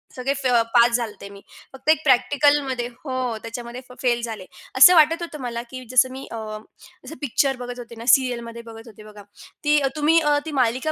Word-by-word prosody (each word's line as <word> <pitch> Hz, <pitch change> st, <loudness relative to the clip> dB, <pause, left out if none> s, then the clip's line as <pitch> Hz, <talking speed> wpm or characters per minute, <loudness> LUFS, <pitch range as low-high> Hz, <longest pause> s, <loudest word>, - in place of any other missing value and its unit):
सगळे 260 Hz, +2 st, -2 dB
फ -, -, +2 dB, 0.3 s
पास 240 Hz, 0 st, +5 dB
झाले 235 Hz, -3 st, -2 dB
होते 200 Hz, -1 st, -12 dB
मी, 200 Hz, 0 st, -13 dB, 0.3 s
फक्त 265 Hz, +3 st, -5 dB
एक 315 Hz, -1 st, +3 dB
प्रॅक्टिकलमध्ये 270 Hz, -1 st, +2 dB
हो, 250 Hz, -1 st, -5 dB
त्याच्यामध्ये 235 Hz, +2 st, -8 dB
फ -, -, -12 dB
फेल 240 Hz, -2 st, +1 dB
झाले. 220 Hz, -5 st, -6 dB, 0.3 s
असं 315 Hz, +8 st, +9 dB
वाटत 325 Hz, +1 st, +4 dB
होतं 310 Hz, -4 st, -7 dB
मला, 235 Hz, -2 st, -4 dB
की 255 Hz, -1 st, -8 dB
जसं 255 Hz, 0 st, +4 dB
मी 265 Hz, +1 st, -8 dB
अ, -, -, -6 dB, 0.7 s
जसं 320 Hz, -, -9 dB
पिक्चर 275 Hz, 0 st, 0 dB
बघत 245 Hz, 0 st, -7 dB
होते 235 Hz, -1 st, -10 dB
ना, 230 Hz, +1 st, -10 dB
सीरियलमध्ये 235 Hz, -3 st, +1 dB
बघत 225 Hz, 0 st, -12 dB
होते 215 Hz, -1 st, -14 dB
बघा, 210 Hz, -1 st, -13 dB, 0.4 s
ती 295 Hz, 0 st, +3 dB
अ, 275 Hz, -, 0 dB
तुम्ही 310 Hz, +2 st, +3 dB
अ, 295 Hz, -1 st, +2 dB
ती 320 Hz, -, -5 dB
मालिका 255 Hz, +6 st, 0 dB
250 Hz, 205 wpm, -22 LUFS, 235-285 Hz, 0.7 s, असं